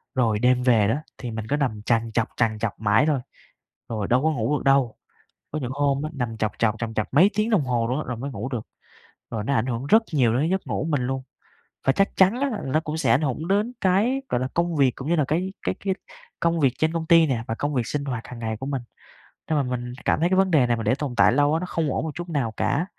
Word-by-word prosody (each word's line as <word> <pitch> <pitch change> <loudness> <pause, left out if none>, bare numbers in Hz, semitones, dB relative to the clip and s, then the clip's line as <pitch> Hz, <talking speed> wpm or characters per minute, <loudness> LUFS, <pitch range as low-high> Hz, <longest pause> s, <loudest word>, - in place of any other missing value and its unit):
Rồi 115 -5 +2
đêm 125 +1 +3
về 115 -5 +4
đó, 110 - +2 0.2
thì 125 -3 -6
mình 110 -1 -5
cứ 145 - +2
nằm 120 -8 -1
trằn 115 -1 +1
trọc, 115 0 +1
trằn 110 -2 +1
trọc 115 -1 -3
mãi 110 +4 +3
thôi, 150 -3 +2 0.7
rồi 110 -3 -2
đâu 125 +3 +2
có 160 - +3
ngủ 135 +1 0
được - - -7
đâu. 135 -4 +3 0.6
Có 155 - -2
những 130 -3 -4
hôm 140 0 +1
á, 155 - -3
nằm 120 -5 -3
trọc 110 0 0
trọc 110 -2 +2
trằn 115 -1 -3
trọc 110 +1 -3
mấy 180 +9 +6
tiếng 215 +2 +1
đồng 205 -9 +3
hồ 120 -3 0
luôn 125 +3 -1
á - - -2
rồi 125 - -3
mới 140 +4 -5
ngủ 130 +1 -5
được. 120 -5 -5 0.6
Rồi 110 -2 -3
nó 140 - 0
ảnh 120 -2 +1
hưởng 125 +1 -3
rất 220 +9 +5
nhiều 125 -7 +3
đến 155 +5 +1
giấc 190 0 -1
ngủ - - -2
của 155 - -3
mình - - -3
luôn. 135 0 -2 0.6
Và 135 - +4
chắc 195 +8 +1
chắn 195 +6 +4
á, 280 0 +1
nó 135 +4 +1
cũng 155 -1 -4
sẽ - - +1
ảnh 140 - +4
hưởng 150 +3 -2
đến 205 +5 +1
cái, 215 +9 +2
gọi 120 - 0
là, 130 - -1
công 170 -1 0
việc 135 -3 +4
cũng 135 - -6
như 170 - +2
là 150 - +2
cái 180 +5 -1
cái - - -1
cái 195 -1 -1 0.5
công 170 0 +1
việc 135 -4 +3
trên 160 +1 +1
công 165 -1 -3
ty 165 -1 +6
nè, 120 -6 -1
và 115 - -1
công 145 +5 -2
việc 125 -4 0
sinh 145 -1 -3
hoạt 125 -5 -4
hàng 125 - -9
ngày 110 -1 -3
của 130 - -6
mình. 135 -3 -2 0.7
Nên 155 - +2
mà 145 - +2
mình 125 -1 -4
cảm - - +2
thấy 170 +2 +2
cái 185 - +2
vấn 190 -1 +3
đề 140 -7 +4
này 120 -1 +1
mà 115 - -4
để 125 - +2
tồn 140 -3 -4
tại - - +6
lâu 145 +2 +3
á, 160 - +2
nó 180 - -3
không 165 -4 -1
ổn - - -1
một 160 - -3
chút 175 0 -6
nào 140 -8 -1
cả. 145 +5 +1
135 Hz, 285 wpm, -24 LUFS, 120-160 Hz, 0.7 s, mấy